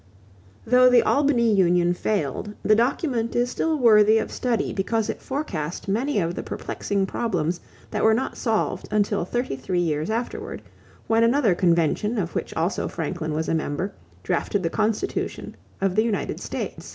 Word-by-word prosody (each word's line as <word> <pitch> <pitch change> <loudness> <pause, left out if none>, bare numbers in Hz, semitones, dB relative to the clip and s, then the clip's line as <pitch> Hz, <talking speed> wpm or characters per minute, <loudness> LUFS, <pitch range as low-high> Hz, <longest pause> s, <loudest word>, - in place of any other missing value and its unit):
Though 250 +2 +6
the 245 -1 +5
Albany 260 -6 +3
union 175 -2 +3
failed, 200 +2 -2
the 215 - +4
document 240 0 0
is 245 +1 +1
still 320 -1 0
worthy 220 -4 +6
of - - -2
study 240 -4 -1
because 220 +3 0
it - - -11
forecast 190 - -4
many 235 +6 0
of 170 -2 -1
the - - -4
perplexing 200 -1 -2
problems 180 -6 -1 0.3
that - - -1
were 220 0 +5
not 265 +3 -2
solved 225 -3 -1
until 205 -2 +1
thirty 240 - -2
three 175 +7 -2
years 155 -1 -1
afterward, 230 +2 -4 0.4
when 225 0 +3
another 235 -3 +3
convention 175 +5 +1
of 175 -5 -2
which - - -3
also 175 +4 -1
Franklin 160 -1 -4
was 160 +1 -2
a - - 0
member 160 +4 -2 0.3
drafted 195 - -1
the 165 - -1
Constitution 215 0 -2 0.3
of 195 -1 +1
the 215 - +4
United 225 -3 -2
States. - - -5
210 Hz, 165 wpm, -24 LUFS, 175-235 Hz, 0.4 s, Though